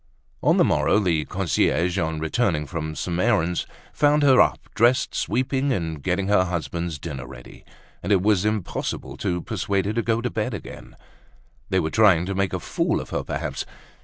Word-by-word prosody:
On - - +3
the - - +5
morrow - - +2
the 85 -7 +1
concierge, 90 0 0
on 80 -2 -1
returning 80 -1 0
from 80 +2 -5
some 85 +1 -3
errand, 90 -6 +1 0.3
found 150 0 +3
her 130 -3 +6
up, - - +3 0.2
dressed, 120 +3 +3
sweeping 135 +2 0
and 80 - -2
getting 95 +4 -1
her 100 -2 +3
husband's 85 -2 -3
dinner 70 -3 -7
ready; 60 -2 -12 0.4
and 95 - -3
it 95 -2 +3
was 105 -3 +3
impossible 105 -3 -3
to 90 -1 -2
persuade 100 -3 -1
her 105 - -1
to 115 - 0
go 115 0 0
to 125 +1 -3
bed 110 +1 -2
again. 100 - -10 0.7
They 95 - +2
were 80 -2 -1
trying 95 -6 +4
to 100 - -3
make 95 0 0
a - - -2
fool - - -1
of - - -8
her - - -1
perhaps! - - -4
95 Hz, 185 wpm, -23 LUFS, 85-110 Hz, 0.7 s, her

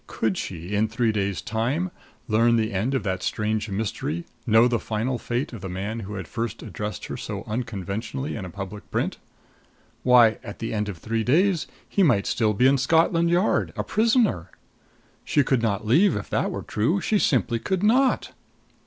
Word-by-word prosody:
Could 110 -4 -1
she 90 +2 -5
in 105 +2 +2
three 115 +1 +1
days' 100 -2 -2
time 130 +12 -1 0.4
learn 115 +1 +4
the 110 -1 0
end 115 +9 0
of 130 - -1
that 95 -2 -2
strange 110 +2 -1
mystery, 95 -6 -3 0.2
know 115 +2 +6
the 120 -2 0
final 115 +3 -2
fate 125 +2 -3
of 115 - -7
the 95 - -5
man 100 +5 -4
who 105 -1 -6
had 95 - -6
first 115 -1 -4
addressed 105 0 -5
her - - -5
so - - -5
unconventionally 110 - -4
in 110 - -5
a 90 - -6
public 100 +3 -8
print? - - -1 0.8
Why, 120 -3 +5
at 100 - -8
the 115 - -4
end 105 -1 -1
of 95 - -6
three 110 +6 -2
days 170 - +2 0.2
he 200 - 0
might 120 - +4
still 110 -3 +1
be 125 - +3
in 135 +1 +5
Scotland 165 +4 +3
Yard, 175 +4 +2
a - - 0
prisoner! 220 - +2 0.7
She 145 - +2
could 130 -1 +1
not 105 -2 -1
leave 160 - +4
if 105 - -5
that - - +1
were - - -5
true 135 - 0
she 205 +4 +1
simply 120 - +1
could 190 - -2
not. 255 +5 +3
115 Hz, 190 wpm, -24 LUFS, 105-135 Hz, 0.8 s, know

